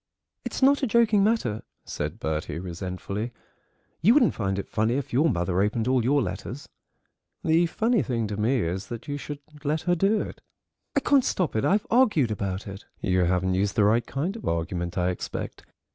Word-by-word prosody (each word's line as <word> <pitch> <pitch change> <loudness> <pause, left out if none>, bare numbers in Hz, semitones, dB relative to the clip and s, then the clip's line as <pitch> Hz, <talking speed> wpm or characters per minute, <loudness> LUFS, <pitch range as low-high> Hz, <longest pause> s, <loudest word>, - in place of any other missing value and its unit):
"It's - - -3
not 280 +1 +5
a 265 - +1
joking 220 -3 +4
matter," 200 - +1 0.2
said 75 +8 -4
Bertie 80 -3 -3
resentfully: 95 +5 -4 0.7
"you 225 +8 +6
wouldn't 270 -6 +5
find 95 -3 -2
it 100 - -4
funny 110 +3 0
if 140 -3 -3
your 150 +6 +4
mother 90 - 0
opened 110 +3 0
all 130 -2 +3
your 140 +3 +3
letters." 100 +9 -6 0.8
"The 165 +2 +3
funny 225 +5 +1
thing 115 -5 -1
to 105 -1 -3
me 115 +4 +1
is 95 +3 -3
that 120 +4 -7
you 145 0 -3
should 145 0 -7 0.2
let 155 +2 0
her 175 - +1
do 195 +5 +2
it." - - -7 0.5
"I - - +3
can't 280 -3 +4
stop 180 - -1
it. 110 - +1
I've 205 +2 +2
argued 215 - +4
about 100 -2 -3
it—" 100 0 -9
"You 90 -1 +2
haven't 90 +1 +1
used 100 +2 0
the 110 - +4
right 110 +3 +3
kind 165 +9 -2
of 230 - -7
argument, 85 +1 -2
I 90 0 +2
expect. 90 - -6
115 Hz, 190 wpm, -26 LUFS, -, 0.8 s, you